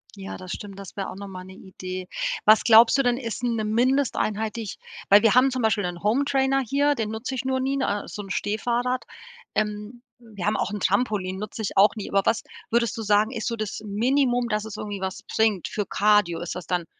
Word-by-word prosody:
Ja, 195 Hz, 0 st, -7 dB
das 185 Hz, 0 st, -9 dB
stimmt, 200 Hz, -2 st, -7 dB
das 195 Hz, -2 st, -10 dB
wäre 195 Hz, -1 st, -4 dB
auch -, -, -8 dB
noch 200 Hz, +1 st, -8 dB
mal 185 Hz, -1 st, -8 dB
'ne 190 Hz, +1 st, -12 dB
Idee. 185 Hz, -1 st, -8 dB, 0.4 s
Was 215 Hz, +1 st, +6 dB
glaubst 230 Hz, +2 st, +7 dB
du 275 Hz, -, +3 dB
denn, 245 Hz, 0 st, +2 dB
ist 235 Hz, -2 st, -5 dB
'ne 230 Hz, -3 st, 0 dB
Mindesteinheit 220 Hz, -2 st, 0 dB
die 230 Hz, -, -3 dB
ich 205 Hz, -, -7 dB, 0.3 s
weil 205 Hz, +3 st, +7 dB
wir 225 Hz, -, +5 dB
haben 255 Hz, +2 st, +5 dB
zum 255 Hz, -1 st, -3 dB
Beispiel 220 Hz, -2 st, +2 dB
'nen 175 Hz, 0 st, -5 dB
Hometrainer 270 Hz, +3 st, +2 dB
hier, 280 Hz, +4 st, +2 dB
den 220 Hz, -3 st, -2 dB
nutze 220 Hz, +4 st, -4 dB
ich 260 Hz, -, -4 dB
nur 260 Hz, 0 st, 0 dB
nie, 270 Hz, +1 st, 0 dB
ne? 205 Hz, -6 st, -1 dB
So 210 Hz, -, -6 dB
'n 195 Hz, -, -10 dB
Stehfahrrad. 240 Hz, +6 st, -1 dB, 0.5 s
Ähm, 210 Hz, +3 st, -3 dB, 0.2 s
wir 215 Hz, -6 st, -8 dB
haben 210 Hz, -, +1 dB
auch -, -, -1 dB
'n 210 Hz, -, -4 dB
Trampolin. 200 Hz, -2 st, 0 dB
Nutze 215 Hz, +2 st, -6 dB
ich 200 Hz, -, -4 dB
auch 200 Hz, +3 st, +6 dB
nie, 210 Hz, -, -6 dB
aber 195 Hz, -, +3 dB
was, 225 Hz, -, +1 dB, 0.3 s
würdest 235 Hz, 0 st, +1 dB
du 225 Hz, -, -3 dB
sagen, 210 Hz, +2 st, +2 dB
ist 225 Hz, -4 st, -4 dB
so 235 Hz, -, -1 dB
das 215 Hz, -2 st, -4 dB
Minimum, 245 Hz, +3 st, +1 dB
dass 210 Hz, 0 st, -1 dB
es 220 Hz, -, -7 dB
irgendwie 205 Hz, -2 st, -5 dB
was 190 Hz, 0 st, -4 dB
bringt, 215 Hz, -6 st, +2 dB
für 210 Hz, -, -3 dB
Cardio? 205 Hz, -5 st, +3 dB
Ist 175 Hz, -, -4 dB
das 180 Hz, -3 st, -7 dB
dann, 175 Hz, -2 st, -1 dB
215 Hz, 230 wpm, -25 LUFS, 200-245 Hz, 0.5 s, glaubst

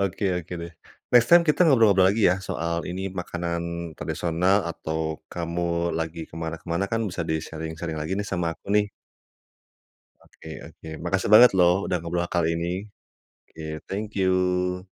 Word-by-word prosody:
Oke 100 Hz, +1 st, -1 dB, 0.2 s
oke 90 Hz, +1 st, -8 dB
deh, 85 Hz, 0 st, -8 dB, 0.4 s
next 120 Hz, -1 st, +6 dB
time 170 Hz, 0 st, +7 dB
kita 150 Hz, -, +2 dB
ngobrol 115 Hz, -10 st, +6 dB, 0.2 s
lagi 105 Hz, +2 st, +1 dB
ya 90 Hz, -, +2 dB
soal 85 Hz, +1 st, -2 dB
ini, 95 Hz, +1 st, -4 dB
makanan 85 Hz, -1 st, -3 dB, 0.4 s
tradisional. 90 Hz, +4 st, +1 dB
Atau 80 Hz, -1 st, -4 dB
kamu 85 Hz, 0 st, -1 dB
lagi 80 Hz, 0 st, -4 dB
ke -, -, -12 dB
mana 80 Hz, 0 st, -3 dB
ke -, -, -31 dB
mana 90 Hz, +4 st, +1 dB
kan 115 Hz, -, +1 dB
bisa 90 Hz, -, -3 dB
di-sharing-sharing 80 Hz, +1 st, -4 dB
lagi 80 Hz, +5 st, -3 dB
nih 105 Hz, -, -3 dB
sama 85 Hz, -3 st, -1 dB
aku, -, -, -33 dB
nih. 105 Hz, -1 st, +2 dB, 1.3 s
Oke 80 Hz, -, -15 dB, 0.2 s
oke, 80 Hz, -, -14 dB
makasih 95 Hz, +3 st, -1 dB
banget 120 Hz, +3 st, +9 dB
loh 90 Hz, +1 st, +3 dB
udah -, -, 0 dB
ngobrol 85 Hz, +1 st, -1 dB
kali 85 Hz, -2 st, 0 dB
ini. 85 Hz, -, -2 dB, 0.8 s
Oke, 80 Hz, -1 st, -7 dB
thank 105 Hz, +2 st, -4 dB
you. 90 Hz, -1 st, +1 dB
85 Hz, 160 wpm, -25 LUFS, 85-95 Hz, 1.3 s, banget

